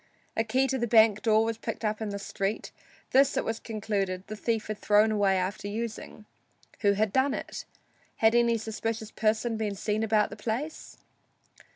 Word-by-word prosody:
A 225 - +2
key 255 +4 +1
to 265 0 -1
the 240 - 0
bank 220 -2 +5
door 220 -2 +3
was 225 0 -3
picked 225 0 -4
up 215 +1 -1
in 220 - -2
the 200 - -4
street; 200 +1 -3 0.4
this, 275 +1 +4
it - - 0
was 225 0 -2
concluded, 200 -4 -2
the 215 - -6
thief 225 0 -1
had 215 -1 -5
thrown 210 +1 +4
away 200 -3 +2
after 185 +2 -2
using. 220 0 -5 0.5
Who 200 -2 +3
had 210 0 0
done 265 +1 +2
it? - - -6 0.5
Had 220 0 +4
any 235 -1 +3
suspicious 220 0 -4
person 220 +1 0
been 210 -2 -2
seen 210 +2 -1
about 215 -1 +2
the - - -6
place? 240 +9 -4
220 Hz, 185 wpm, -28 LUFS, 210-230 Hz, 0.5 s, bank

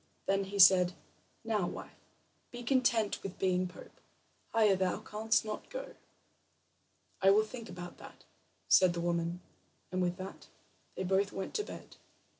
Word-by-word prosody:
Then 195 0 +1
he 200 +1 -6
said: 180 -1 +7 0.5
"Now, 215 -5 0
wife, - - -9 0.4
be 245 -1 -8
content 240 -4 +2
with 195 -1 -7
being 185 -1 +1
pope; 180 - -14 0.5
higher 215 -3 +4
thou 185 -1 0
canst 220 +1 0
not 215 0 -6
go." - - -6 1.3
"I 195 - +6
will 210 +2 +5
think 230 0 -9
about 175 -1 -9
that," - - -13 0.4
said 185 -2 +6
the 170 - -4
woman, 170 0 -1 0.5
and 185 0 -1
with 180 0 0
that 190 +1 -9 0.5
they - - -3
both 195 +2 +1
went 195 - -5
to 420 - 0
bed. - - -10
195 Hz, 150 wpm, -32 LUFS, 180-215 Hz, 1.3 s, said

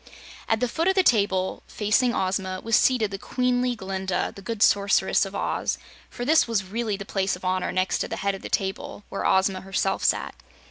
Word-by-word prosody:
At 225 +1 +1
the 250 - +2
foot 330 +8 -1
of 380 - +3
the 380 - +4
table, 200 - +2
facing 215 +4 +1
Ozma, 190 -2 -1
was 230 -1 +2
seated 230 -6 +3
the 195 - -5
queenly 250 +1 0
Glinda, 190 -2 -3
the 200 - -10
good 220 +2 -1
Sorceress 200 0 +3
of - - -9
Oz, - - -1 0.3
for 245 - -6
this 310 +1 +4
was 225 -4 0
really 210 +2 -3
the 200 - -7
place 195 -2 -1
of 180 - -11
honor 185 0 0
next 185 +1 0
to - - -1
the - - -4
head 200 0 0
of 195 - -7
the - - -7
table 195 +1 -3
where 195 - -2
Ozma 190 0 +2
herself 195 0 -1
sat. - - +1
200 Hz, 205 wpm, -25 LUFS, 190-235 Hz, 0.3 s, the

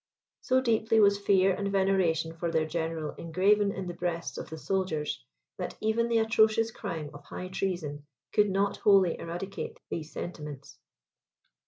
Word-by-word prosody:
So 260 0 +2
deeply 225 -2 +2
was 200 -1 +5
fear 195 -1 +4
and 200 +1 -2
veneration 190 -5 +2
for 170 +1 -2
their 160 -1 +1
general 160 -1 -3
engraven 200 +5 +2
in 190 -1 -5
the 175 - -4
breasts 170 -1 -3
of - - -7
the 160 - -6
soldiers, 155 - -2 0.4
that - - -4
even 220 +2 +1
the 230 -1 +2
atrocious 220 0 +3
crime 165 -10 -5
of 145 0 -11
high 185 +5 -6
treason 175 -7 -3 0.3
could 210 -1 +4
not 195 +1 +1
wholly 195 -4 +4
eradicate 175 +4 -5
these 160 -2 -4
sentiments. 150 -5 -7
185 Hz, 155 wpm, -29 LUFS, 165-205 Hz, 0.4 s, was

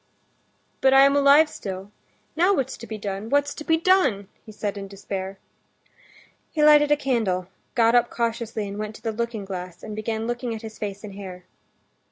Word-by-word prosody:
"But 265 0 +5
I 270 - +8
am 275 +1 +5
alive 285 +2 +6
still. 195 -8 -7 0.4
Now 360 +5 +4
what's 265 -3 -2
to 230 - -11
be 220 - -5
done? 200 +1 -5
what's 285 +1 +2
to 305 - -8
be 320 +1 +3
done?" 300 - +2
he 220 - -12
said 210 -1 -4
in 200 -1 -6
despair. 195 0 -6 1.1
He 305 - 0
lighted 295 -1 +7
a 295 - +5
candle, 220 -10 -1 0.3
got 230 -1 +4
up 240 -1 +4
cautiously 230 -2 -2
and 200 +1 -6
went 215 0 -5
to 220 - -14
the 225 - -1
looking 225 -2 -3
glass, 180 -2 -7
and 215 - -6
began 220 +1 -3
looking 240 0 -3
at 220 - -9
his 220 -1 -9
face 200 -1 -5
and 205 -2 -8
hair. 185 -2 -9
220 Hz, 195 wpm, -24 LUFS, 200-270 Hz, 1.1 s, I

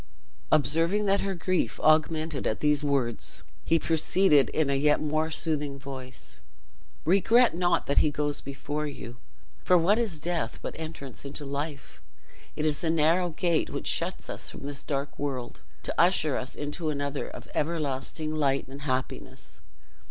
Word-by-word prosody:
Observing 165 +7 +3
that 200 0 +3
her 195 -1 -2
grief 185 +1 0
augmented 155 -1 +2
at 110 - -1
these 150 -1 +3
words, 135 -5 0 0.2
he 165 - +3
proceeded 160 -2 +3
in 155 -2 +1
a 140 - +1
yet 150 +2 +3
more 155 +1 0
soothing 150 -3 -1
voice: 130 -2 -8 0.7
"Regret 220 +8 +5
not 175 +1 +1
that 140 - +3
he 150 - +4
goes 145 0 -2
before 145 +2 -4
you, 120 -4 -8 0.5
for 180 - +5
what 195 +7 +3
is 215 -9 -1
death 165 -7 -2
but - - -4
entrance 155 -5 -7
into 140 +1 -5
life? 140 +1 -5 0.5
It 150 - -1
is 150 -2 +1
the 165 - 0
narrow 165 +3 +3
gate, 170 0 0
which - - -5
shuts - - 0
us - - -4
from - - -9
this 140 0 -4
dark 140 0 -3
world, 130 -4 -4 0.2
to - - -3
usher 165 -5 +3
us 130 - -3
into 150 +2 -3
another, 140 -1 -2
of - - -10
everlasting 155 0 -1
light 140 -3 +1
and 135 +2 -9
happiness. 130 -2 -4
150 Hz, 160 wpm, -28 LUFS, 140-165 Hz, 0.7 s, Regret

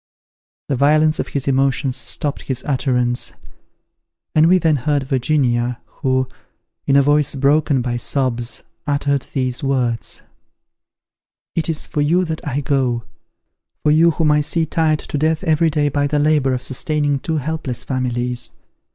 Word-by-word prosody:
The 140 - 0
violence 155 +3 +3
of - - -1
his 140 -1 -4
emotions 135 -1 +1
stopped 140 +2 -4
his 130 -3 -3
utterance, 125 -3 0 1.0
and 155 +1 +5
we 185 +2 +5
then 160 -4 +2
heard 145 +2 0
Virginia, 125 -3 0
who, 130 -2 -1 0.6
in 135 - +3
a 140 - +6
voice 145 +1 +2
broken 140 -1 +2
by 120 -1 -2
sobs, 120 -2 -2 0.2
uttered 140 -1 0
these 130 -2 -2
words: 125 -4 -1 1.3
"It 165 0 -1
is 160 -2 0
for 150 - -2
you 175 +5 +2
that 160 -1 -4
I 145 +1 -1
go, 130 -4 0 0.8
for 150 - +4
you 160 +3 +5
whom 160 -2 +2
I 150 0 +3
see 160 +2 0
tired 155 0 +1
to 150 - -4
death 160 +3 +1
every 160 -1 +3
day 150 -1 +1
by 145 0 0
the 150 +1 0
labour 145 -3 +2
of 125 - -4
sustaining 145 +1 0
two 160 +3 -2
helpless 150 -4 -3
families. 125 -2 -2
140 Hz, 150 wpm, -19 LUFS, 130-155 Hz, 1.3 s, a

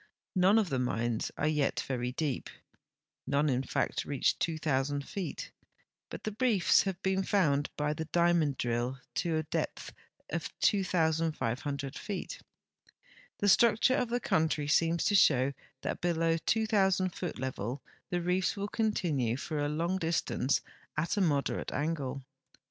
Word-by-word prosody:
None 190 +3 +5
of 215 -5 +2
the 130 - 0
mines 120 -2 -1
are - - 0
}mt 150 -3 +1
very 125 -2 -2
deep; 140 -1 -2 0.8
none 145 +1 +2
in 130 -1 +1
fact - - -1
reach 140 -3 0
2,000 145 -4 -1
feet, 195 -3 -5 0.6
but - - -8
the 215 -1 -4
reefs 230 -9 +4
have 190 -3 -2
been 190 0 +1
found 150 -8 +2
by 150 0 0
the 160 +1 -4
diamond 170 -4 +2
drill 120 +2 -1 0.2
to 160 +6 0
a 155 - 0
depth 155 - -3 0.4
of - - -2
2,500 155 - 0
feet. 200 -3 -5 1.0
The 205 - 0
structure 235 +4 +5
of 250 -4 0
the 245 +1 0
country 160 -7 +1
seems 165 +2 +2
to - - +2
show 140 -8 +4 0.3
that - - -3
below 165 -1 +2
the 165 - -1
2,000 195 -2 +2
foot 175 -4 -4
level 130 0 -4 0.3
the 175 -1 -1
reefs 180 +3 +1
will 200 +1 -3
continue 160 - 0
for 150 +2 -4
a 145 0 0
long 170 +5 -1
distance 160 -5 0 0.4
at 165 +6 0
a 205 - +1
moderate 145 -7 0
angle. 140 -3 -2
160 Hz, 150 wpm, -31 LUFS, 140-185 Hz, 1.0 s, None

